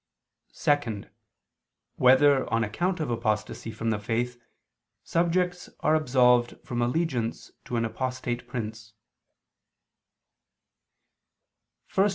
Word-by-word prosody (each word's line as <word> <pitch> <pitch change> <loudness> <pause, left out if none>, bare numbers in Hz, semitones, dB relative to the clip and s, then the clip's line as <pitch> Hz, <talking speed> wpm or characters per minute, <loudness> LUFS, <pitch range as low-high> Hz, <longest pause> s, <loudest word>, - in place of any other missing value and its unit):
(2) 120 -9 0 0.9
Whether, 130 +2 +5
on 115 0 +2
account 175 - -1
of 155 -6 -2
apostasy 110 -1 -2
from 115 +1 -2
the 105 - -1
faith, 120 +3 -2 0.6
subjects 180 +1 0
are 155 - +3
absolved 125 -5 +3
from 120 -1 -2
allegiance 120 -2 -1
to 125 - -4
an 115 -1 +1
apostate 125 0 -3
prince? 110 -2 -6
125 Hz, 90 wpm, -27 LUFS, 115-145 Hz, 0.9 s, Whether